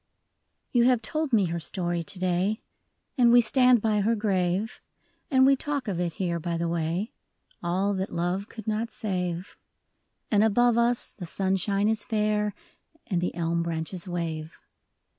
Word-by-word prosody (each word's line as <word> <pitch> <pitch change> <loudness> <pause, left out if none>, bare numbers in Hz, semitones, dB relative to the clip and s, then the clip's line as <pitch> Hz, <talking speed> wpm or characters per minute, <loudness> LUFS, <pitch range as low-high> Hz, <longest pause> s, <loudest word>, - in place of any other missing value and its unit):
OU 240 - +6
have 250 -2 +4
told 310 +4 -2
me 210 -5 +4
her 170 0 -2
story 175 0 -2
to 185 - -6
day, 185 +3 0 0.6
And 240 -1 +6
we 245 - +8
stand 250 0 +4
by 215 -2 +2
her 225 +3 +2
grave; 195 0 -1 0.5
And 260 -3 +5
we 275 0 +6
talk 285 -1 -3
of 185 -4 -2
it 175 -2 -1
here 170 -3 -2
by 170 +1 -2
the 170 0 -1
way, 170 +5 -1 0.5
All 185 +4 0
that 190 0 -3
love 175 +4 -2
could 220 - -9
not 220 +2 -1
save. 180 -5 -3 0.7
And 210 -1 +4
above 235 +2 +4
us 235 +1 +1
the 180 -5 -8
sunshine 195 +3 0
is 220 -1 +1
fair, 210 -2 0 0.5
And 180 -6 -1
the 175 - -2
elm 170 0 0
branches 170 +2 -3
wave. 165 -3 -4
195 Hz, 160 wpm, -27 LUFS, 175-220 Hz, 0.7 s, we